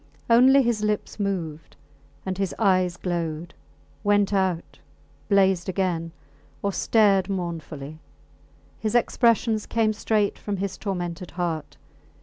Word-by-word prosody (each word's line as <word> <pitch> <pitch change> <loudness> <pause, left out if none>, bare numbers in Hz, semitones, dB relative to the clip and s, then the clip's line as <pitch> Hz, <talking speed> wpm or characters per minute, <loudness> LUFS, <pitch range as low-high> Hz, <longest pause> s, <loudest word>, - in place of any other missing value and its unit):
Only 260 +4 +7
his 235 -3 0
lips 210 0 -2
moved, 170 -6 -3 0.5
and 190 0 -3
his 195 -2 -1
eyes 185 -4 +2
glowed, 170 -2 -3 0.5
went 205 -1 +2
out, 185 -4 -1 0.5
blazed 190 -3 +3
again, 175 -3 -1 0.5
or 200 -1 0
stared 200 -4 +3
mournfully. 160 -5 -5 0.8
His 220 +1 -2
expressions 230 -2 +2
came 220 -1 +1
straight 210 -1 0
from 205 -1 -3
his 190 0 -3
tormented 180 -3 -4
heart. 165 -4 -3
195 Hz, 115 wpm, -25 LUFS, 175-210 Hz, 0.8 s, Only